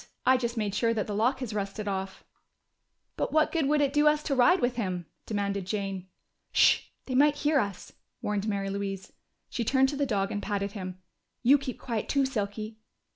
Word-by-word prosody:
I 260 - +6
just 235 -2 -2
made 210 -3 -1
sure 230 +2 +1
that 215 - 0
the 210 - -4
lock 245 +6 +1
has 235 -4 -4
rusted 205 0 -3
off." 190 -1 -3 0.9
"But - - -1
what 310 0 +3
good 320 -5 +1
would 300 +1 +3
it 280 -1 +1
do 295 0 +4
us 300 0 +3
to 285 - -1
ride 275 +9 +5
with 245 -3 +1
him?" 185 -6 -2 0.2
demanded 200 -3 -2
Jane. 195 -2 -3 0.4
"Sh! - - +5 0.2
They 260 - -4
might 290 +3 +5
hear 295 0 +2
us!" 200 -5 -4 0.3
warned 210 0 -2
Mary 200 -2 -1
Louise. 195 -1 -4 0.4
She 240 - -1
turned 265 +3 +3
to 290 - -3
the 280 0 0
dog 195 -4 0
and 205 - -2
patted 200 -1 -2
him. 185 -3 -6 0.5
"You 275 +4 +6
keep 265 -3 -5
quiet 230 -4 -3
too, 280 -1 +3
Silky.... 215 -2 -4
220 Hz, 200 wpm, -28 LUFS, 200-270 Hz, 0.9 s, I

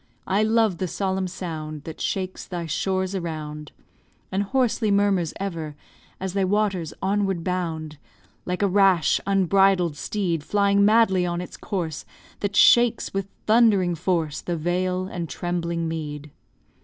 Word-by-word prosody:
I 195 +2 +1
love 220 -4 +2
the 185 - -1
solemn 190 +1 -1
sound 155 -5 -6
That 160 0 -8
shakes 185 -1 -3
thy 175 -2 -4
shores 190 +4 -1
around, 155 -4 -5 0.6
And 190 - 0
hoarsely 235 0 +1
murmurs, 200 -5 +2
ever, 165 -6 -4 0.4
As 190 -1 -4
thy 195 -1 +1
waters 190 -4 0
onward 195 -3 0
bound, 160 -4 -3 0.4
Like 180 +2 -2
a - - +4
rash, 195 -3 +3
unbridled 195 -3 +3
steed 170 -1 -2
Flying 200 +2 +2
madly 210 -3 +4
on 175 -1 -1
its 180 - -7
course; 170 -7 -4 0.4
That 200 -1 -2
shakes 240 +2 +5
with 195 0 -2 0.2
thundering 215 -6 +4
force 165 -3 -1
The 175 -1 -3
vale 180 +3 -1
and 175 -4 -5
trembling 170 -1 -2
mead. 150 -2 -5
185 Hz, 140 wpm, -24 LUFS, 165-200 Hz, 0.6 s, shakes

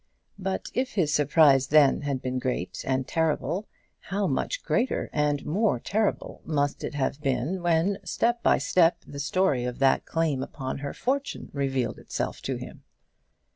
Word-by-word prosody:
But 190 0 -3
if 255 0 -1
his 160 -7 +1
surprise 145 -2 +5
then 150 -2 +5
had 140 -3 -2
been 130 0 -1
great 125 0 -3
and 130 0 0
terrible, 160 +5 0 0.3
how 200 +1 -2
much 190 - -1
greater 250 +2 0
and 150 -1 0
more 185 - +1
terrible 215 - -1
must 145 -2 -1
it - - -4
have 135 +1 -1
been 140 +6 -1
when, 175 +3 +2
step 235 +6 0
by - - +4
step, 175 -1 +3
the 140 - -8
story 145 -2 +1
of 125 0 -3
that 135 -1 +2
claim 160 -5 0
upon 130 0 -5
her 140 0 -5
fortune 275 +2 -2
revealed 135 -4 -1
itself - - -4
to - - 0
him! - - -9
150 Hz, 160 wpm, -27 LUFS, 135-185 Hz, 0.3 s, surprise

